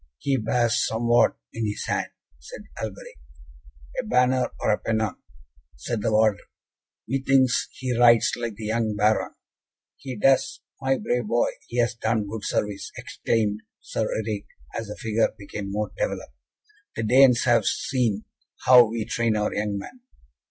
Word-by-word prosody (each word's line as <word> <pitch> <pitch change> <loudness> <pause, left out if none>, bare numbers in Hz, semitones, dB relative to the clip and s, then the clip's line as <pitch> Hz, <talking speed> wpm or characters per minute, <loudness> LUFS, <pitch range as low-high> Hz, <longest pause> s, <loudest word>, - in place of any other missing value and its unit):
"He 140 - 0
bears 120 0 +1
somewhat 120 +1 +2 0.2
in 115 -1 -2
his 105 - -4
hand," - - -1 0.3
said 60 - -10 0.2
Alberic. 100 - -7 0.8
"A - - -1
banner 125 +2 +2
or 105 - +2
pennon," 110 -1 -1 0.6
said 105 - -4
the 110 - 0
warder; 110 -1 +3 0.7
"methinks 135 0 +2
he 130 -2 -3
rides 120 -1 +5
like 120 -3 -4
the 110 - -7
young 110 -1 0
Baron." 105 +1 +1 0.6
"He 130 -2 -7
does! 135 +4 +2 0.2
My 135 0 +1
brave 120 -3 -1
boy! 120 +2 +2 0.2
He 120 - -6
has 120 0 +2
done 110 -2 -1
good 105 +1 -6
service," 105 -1 -2
exclaimed 105 -2 -1 0.2
Sir 110 - -3
Eric, 105 -2 -3 0.3
as 115 - -4
the 105 - -6
figure 110 -1 0
became 100 0 -6
more 105 +1 -2
developed. - - -3 0.6
"The 115 - -2
Danes 125 +2 +5
have 120 -2 +3
seen 115 -6 0 0.4
how 125 -2 +9
we 110 0 -3
train 115 -2 0
our 105 0 0
young 105 -1 -1
men." 250 - -9
115 Hz, 150 wpm, -25 LUFS, 105-125 Hz, 0.8 s, how